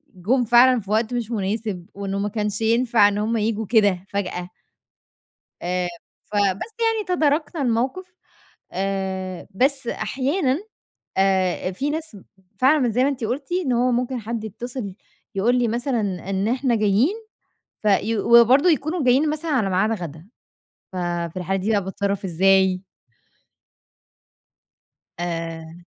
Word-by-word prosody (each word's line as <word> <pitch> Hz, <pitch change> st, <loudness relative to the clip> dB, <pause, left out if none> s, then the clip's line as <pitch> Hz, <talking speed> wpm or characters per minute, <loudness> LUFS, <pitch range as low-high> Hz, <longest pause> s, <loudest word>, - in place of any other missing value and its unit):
جُم 235 Hz, +8 st, +1 dB
فعلًا 245 Hz, +2 st, +6 dB
في 205 Hz, -1 st, -9 dB
وقت 220 Hz, +2 st, +1 dB
مش 240 Hz, -2 st, -3 dB
مناسب، 205 Hz, -3 st, -2 dB
وإنه 200 Hz, 0 st, -4 dB
ما 205 Hz, +1 st, -1 dB
كانش 210 Hz, 0 st, -2 dB
ينفع 230 Hz, -1 st, +4 dB
إن 205 Hz, 0 st, -1 dB
هُم 220 Hz, +2 st, 0 dB
ييجوا 220 Hz, 0 st, -1 dB
كده 200 Hz, -4 st, +2 dB
فجأة. 180 Hz, -3 st, -3 dB, 1.1 s
آآ، 180 Hz, 0 st, -1 dB, 0.4 s
فبس 205 Hz, -, 0 dB
يعني 450 Hz, -2 st, +1 dB
تداركنا 310 Hz, -2 st, +1 dB
الموقف، 260 Hz, +10 st, -1 dB, 0.6 s
آآ، 190 Hz, -1 st, -3 dB
بس 265 Hz, +4 st, +1 dB
أحيانًا 265 Hz, -, 0 dB, 0.6 s
آآ، 190 Hz, -1 st, +1 dB
في 280 Hz, +10 st, -2 dB
ناس 315 Hz, -6 st, -4 dB, 0.4 s
فعلًا 270 Hz, +6 st, +5 dB
مش 250 Hz, -4 st, +1 dB
زي 250 Hz, +4 st, +2 dB
ما 270 Hz, -, +3 dB
أنتِ 265 Hz, -5 st, -3 dB
قلتِ 270 Hz, +7 st, -3 dB
إن 350 Hz, -8 st, 0 dB
هو 245 Hz, +1 st, +2 dB
ممكن 250 Hz, +1 st, -1 dB
حد 225 Hz, 0 st, -4 dB
يتصل 220 Hz, -1 st, -6 dB, 0.4 s
يقول 225 Hz, +6 st, +2 dB
لي 240 Hz, -1 st, +2 dB
مثلًا 240 Hz, +2 st, -1 dB, 0.3 s
إن 195 Hz, +2 st, 0 dB
إحنا 250 Hz, 0 st, +1 dB
جايين 215 Hz, -, +2 dB, 0.7 s
في 215 Hz, +2 st, +2 dB
وبرضو 235 Hz, -, +6 dB
يكونوا 315 Hz, 0 st, +1 dB
جايين 265 Hz, +5 st, +4 dB
مثلًا 310 Hz, +2 st, -3 dB
على 235 Hz, -9 st, +1 dB
ميعاد 195 Hz, +4 st, +2 dB
غد.ا 170 Hz, -4 st, -6 dB, 1.0 s
ففي 170 Hz, +3 st, -11 dB
الحالة 190 Hz, +2 st, -1 dB
دي 195 Hz, +4 st, -2 dB
بقى 205 Hz, -2 st, +2 dB
باتصرف 200 Hz, +1 st, -2 dB
إزاي؟ 190 Hz, +1 st, +3 dB, 2.4 s
آآ 165 Hz, -1 st, -5 dB
220 Hz, 135 wpm, -22 LUFS, 195-255 Hz, 2.4 s, فعلًا